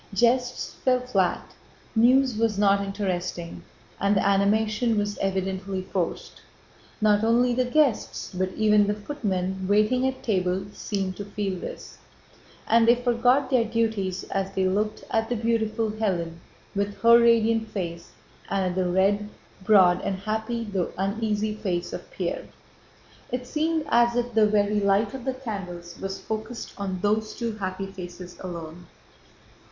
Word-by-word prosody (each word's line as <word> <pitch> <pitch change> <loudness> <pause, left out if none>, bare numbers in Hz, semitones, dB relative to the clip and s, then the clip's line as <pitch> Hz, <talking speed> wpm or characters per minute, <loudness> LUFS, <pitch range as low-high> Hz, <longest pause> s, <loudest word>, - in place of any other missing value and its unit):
Jests 245 +3 +1
fell 255 -1 +3
flat, 195 -8 -1 0.4
news 250 +2 +4
was 220 -2 +1
not 200 -1 +3
interesting, 180 -4 -3 0.4
and 200 +1 +2
the 195 - +2
animation 215 +3 +2
was 205 0 -1
evidently 190 0 -2
forced. 185 -2 -4 0.6
Not 210 -1 +3
only 240 +2 +3
the 250 +1 +1
guests 265 -6 0
but 185 +1 -1
even 210 -1 +4
the 205 - 0
footmen 190 -6 -3
waiting 215 +6 +3
at 265 0 -4
table 190 -4 0
seemed 195 -3 -3
to 205 - -5
feel 200 -2 -3
this, - - -8 0.7
and 230 0 +4
they 235 - +7
forgot 245 +3 +2
their 250 -3 +4
duties 220 -5 -1
as 195 0 -1
they 190 -1 +2
looked 210 +3 -1
at 225 0 +1
the 245 - 0
beautiful 225 -1 0
Hélène 180 -6 -2 0.4
with 200 0 -1
her 235 0 +8
radiant 230 -1 +3
face 170 -5 -5 0.4
and 190 -2 0
at - - -6
the 185 -1 0
red, 200 +3 +2 0.3
broad, 185 -3 +5
and 195 - -2
happy 220 +4 -3
though 195 -5 -2
uneasy 210 +2 -1
face 180 -5 -3
of - - -7
Pierre. - - -4 0.8
It 250 0 -3
seemed 315 +3 0
as 235 -1 +4
if 245 0 -1
the 215 -1 +5
very 210 0 +2
light 200 +1 +2
of 265 -2 -7
the 265 -1 -1
candles 180 -9 -7
was 195 0 -4
focused 220 +2 -5
on 190 -2 -4
those 215 +1 0
two 235 -3 -3
happy 190 -1 -3
faces 180 -2 -9
alone. 170 -1 -8
210 Hz, 150 wpm, -25 LUFS, 190-230 Hz, 0.8 s, her